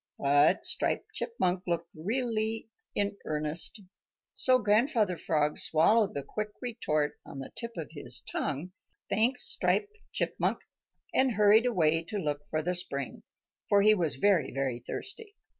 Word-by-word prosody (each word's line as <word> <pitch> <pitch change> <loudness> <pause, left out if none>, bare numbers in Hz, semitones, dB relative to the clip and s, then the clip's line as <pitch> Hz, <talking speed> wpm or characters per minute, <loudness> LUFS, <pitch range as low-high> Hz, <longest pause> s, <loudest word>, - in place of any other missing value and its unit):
But 145 +5 +3
Striped - - +2
Chipmunk 185 - -1
looked 170 0 -2
really 225 +4 -2 0.2
in 200 0 -1
earnest, 155 +7 0 0.5
so 255 -1 +5
Grandfather 215 - +2
Frog 150 -2 0
swallowed 205 +7 +3
the 140 - -3
quick 215 +7 -4
retort 155 - -2
on - - -11
the 135 - -7
tip 235 -4 -6
of 160 - -5
his 150 -3 -2
tongue, 150 +6 -3 0.4
thanked 235 +5 +2
Striped 420 0 +1 0.2
Chipmunk, - - -1 0.5
and 260 -2 +3
hurried 215 +3 +5
away 165 -8 +2
to 210 +4 -4
look 145 -5 -3
for 155 0 -1
the 180 +2 -1
spring, 140 -7 -2 0.5
for 200 -1 +4
he 215 +1 +6
was 165 - +1
very, 175 -1 +2
very 135 -3 -2
thirsty. 410 - -7
185 Hz, 140 wpm, -29 LUFS, 155-225 Hz, 0.5 s, he